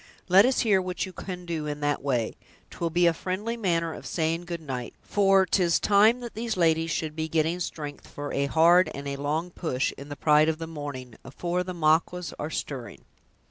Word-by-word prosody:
Let 195 +6 +7
us 260 - +2
hear 205 -5 +3
what 180 -1 -3
you 185 - -10
can 180 0 -7
do 160 -3 -3
in 150 0 -4
that 145 0 0
way; 125 -5 -1 0.4
'twill 170 - -2
be 175 +2 +2
a 170 - +5
friendly 190 +7 -3
manner 170 -7 0
of - - -9
saying 165 +1 -1
good 170 -1 -4
night, 130 -6 -6
for 195 -2 +4
'tis 175 -2 +2
time 215 +4 +4
that 240 -1 -7
these 225 -1 -3
ladies 165 -1 +2
should 155 -1 -2
be 160 0 -2
getting 160 +2 +1
strength 150 -4 -6
for 145 0 -6
a 140 0 +1
hard 165 +3 +5
and 140 +1 -6
a 140 0 -3
long 155 +5 -2
push, 140 -7 -1
in 140 +1 -9
the 145 - -5
pride 150 +2 +4
of 160 - -1
the 165 - -5
morning, 145 -7 -7
afore 175 +7 -2
the 180 0 -6
Maquas 165 +2 +1
are 150 - -3
stirring." 135 -5 -6
165 Hz, 210 wpm, -27 LUFS, 150-180 Hz, 0.4 s, Let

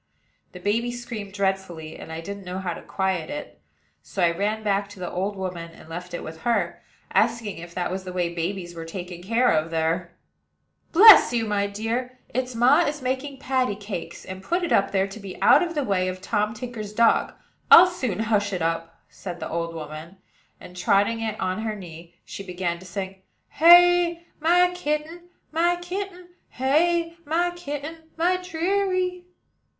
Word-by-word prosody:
The 180 - -9
baby 225 +6 0
screamed 235 -4 -6
dreadfully, 190 -5 -2
and - - -10
I 160 0 -5
didn't 200 +3 -7
know 180 0 -5
how 185 -2 -3
to - - -9
quiet 190 -4 -2
it; 100 - -7 0.4
so 190 - -3
I 170 - +4
ran 210 +5 -2
back 200 -1 0
to 205 - -13
the 180 - -4
old 195 +3 -2
woman, 180 -3 -5
and - - -15
left 175 +2 -6
it - - -6
with 160 +1 -8
her, 210 -8 0 0.3
asking 225 -6 +1
if 170 0 -10
that 180 -1 -2
was 190 0 -4
the 185 - -7
way 175 -1 -1
babies 175 +1 -3
were 165 -1 -7
taken 175 +1 -7
care 230 +6 +2
of 155 +1 +1
there. 165 +2 -1 0.7
"Bless 420 - +9
you, 230 -2 +1
my 205 -1 0
dear! 230 +5 -3
its 255 0 -3
ma 250 +6 +5
is 295 -4 -2
making 265 +2 -2
patty 255 -5 0
cakes; 200 -3 -7
and 185 0 -7
put 345 - -1
it 345 - -2
up 195 - +3
there 195 -1 +1
to 195 +2 -9
be 195 -3 -9
out 295 - +6
of 340 -2 -2
the 295 - 0
way 190 -5 0
of 185 0 -4
Tom 210 +3 -1
Tinker's 235 -4 -6
dog. 230 +1 +3 0.4
I'll 350 - +11
soon 255 - -2
hush 205 -2 +1
it 180 - -2
up," 165 0 -3
said 175 -3 -8
the - - -5
old 170 0 -3
woman; 155 +3 -8 0.4
and, 180 - -12
trotting 200 +5 +2
it 220 -1 -3
on 185 +2 -1
her 220 -1 -2
knee, 170 -3 -11
she - - -8
began 180 -2 -3
to 185 - -12
sing: 190 +1 -6 0.3
"Hey! 345 0 +6
my 355 +3 +4
kitten, 330 +1 -3 0.2
my 340 +2 +2
kitten, 360 0 -6 0.2
Hey! 335 +6 +1
my 340 +3 0
kitten, 320 -1 -7
my 355 +3 +2
deary." 365 +1 -1
205 Hz, 185 wpm, -24 LUFS, 180-295 Hz, 0.7 s, I'll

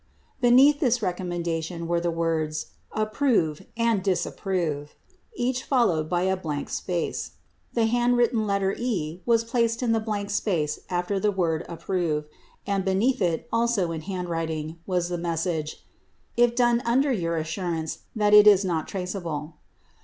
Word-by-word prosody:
76 - - -34
Beneath 265 +4 +6
this 250 -5 +2
recommendation 170 -2 -3
were 170 0 +1
the 175 - 0
words 160 -2 -1 0.2
"Approve" 215 - 0
and 230 -3 +2
"Dis 190 -3 +1
approve," 160 -7 -3 0.4
each 255 -4 -1
followed 175 - +2
by 175 0 +1
a 190 0 +2
blank 155 -6 -4
space. 175 -3 -3 0.4
The 230 -2 +3
handwritten 240 -1 +2
letter 200 -1 +1
"E" 180 -9 -3
was 230 -1 +4
placed 230 0 0
in 235 - +2
the 225 - +3
blank 210 -2 -3
space 170 -8 0
after 180 +2 -1
the 210 - +2
word 170 -5 0
"Approve" 170 -3 -1 0.4
and 200 -1 0
beneath 205 +7 +1
it, 170 -3 0
also 230 -7 +1
in 160 -1 -4
handwriting, 165 -3 -4
was 180 -2 0
the 175 -1 -2
message 165 -2 -2 0.5
"if 240 -1 +3
done 240 -1 +3
under 265 +4 +2
your 170 -7 -1
assurance 160 0 -3 0.2
that 210 -1 +2
it 210 0 +9
is 200 -2 +7
not 165 -4 -1
traceable." 175 -5 -4
185 Hz, 150 wpm, -25 LUFS, 165-230 Hz, 0.5 s, it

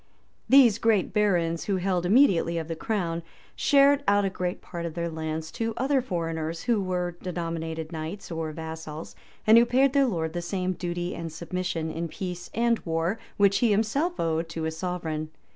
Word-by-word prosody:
These 245 -6 +7
great 220 -5 +2
barons, 175 -6 +1
who 200 - 0
held 180 -1 0
immediately 185 -7 +4
of 160 -1 -3
the 165 - -3
crown, 170 -3 -2 0.3
shared 280 0 +4
out 205 0 +4
a 195 - 0
great 180 -1 -3
part 170 -1 -7
of 170 -1 -5
their 170 0 -2
lands 160 0 -4
to 225 -1 -3
other 270 +1 +2
foreigners, 165 -6 -3
who 235 -4 +2
were 180 -2 -2
denominated 165 -2 -4
knights 165 +5 -6
or 165 -1 -3
vassals, 160 0 -7 0.3
and 220 +2 +8
who 235 - +5
paid 265 +2 +3
their 280 -2 +4
lord 160 -7 -2
the 175 - -2
same 185 +1 -2
duty 175 0 -3
and 165 -1 -5
submission, 170 0 -3
in 170 +1 -3
peace 180 0 -6
and 235 0 +2
war, 165 +5 -1 0.2
which 200 -1 +4
he 240 - +3
himself 225 - +1
owed, 165 0 0
to 165 -1 -4
his 160 0 -2
sovereign. 160 -3 -3
175 Hz, 180 wpm, -27 LUFS, 165-210 Hz, 0.3 s, and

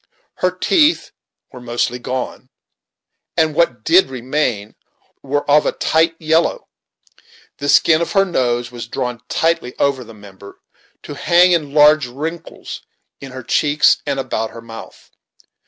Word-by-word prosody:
Her 185 - +1
teeth 305 - +1 0.4
were 125 - -11
mostly 120 +1 -2
gone, 130 +1 -5 0.9
and 160 -1 +2
what 140 -9 0
did 170 -2 +4
remain 125 -4 -2 0.5
were 145 +1 -2
of 150 +1 +4
a - - 0
tight 165 +1 +1
yellow. 160 +1 0 0.9
The 145 - -3
skin 160 +2 +4
of 170 - -3
her 195 -1 +4
nose 120 -8 -1
was 120 -2 -8
drawn 120 0 -4
tightly 165 -6 -1
over 140 -2 0
the 115 -1 -14
member, 100 -1 -14 0.4
to - - -8
hang 175 +5 +4
in 155 -4 0
large 150 -2 +5
wrinkles 155 +7 -7 0.4
in 135 -2 -10
her 130 -1 -8
cheeks 145 +4 +2
and 140 -1 -1
about 110 -4 -3
her 115 - -11
mouth. 115 0 -12
140 Hz, 140 wpm, -18 LUFS, 120-160 Hz, 0.9 s, large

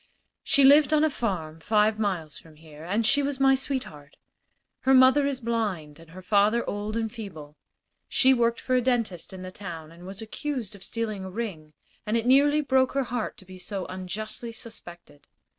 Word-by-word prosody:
"She 280 - +3
lived 290 +2 +6
on 305 - +3
a 315 - +2
farm 170 -11 -3
five 215 +4 +2
miles 175 -8 -2
from 160 -2 -18
here, 155 -1 -14
and 205 +7 0
she 285 +6 +4
was 280 -1 -2
my 270 0 +5
sweetheart. 255 - -4 0.6
Her 265 0 +4
mother 260 +2 +6
is 275 -2 -2
blind 205 - -3
and 165 -1 -16
her 185 +3 -11
father 210 +4 +2
old 210 +2 -3
and 225 -1 -2
feeble. 160 -10 -9 0.5
She 265 0 +4
worked 235 -2 +1
for 255 - -2
a 255 - +4
dentist 230 -8 -1
in 185 -1 -8
the 185 - -7
town 165 -5 -8
and 175 +2 -13
was 195 +1 -8
accused 235 0 -4
of 195 - -12
stealing 215 -4 -3
a 190 - -6
ring, 185 -8 -6 0.3
and 215 +2 0
it 230 - -2
nearly 285 +4 +5
broke 265 -2 +2
her 275 0 +1
heart 245 -2 -4
to 195 - -12
be 185 0 -12
so 195 0 -4
unjustly 215 +5 -6
suspected. 175 -10 -12
215 Hz, 195 wpm, -26 LUFS, 180-255 Hz, 0.6 s, lived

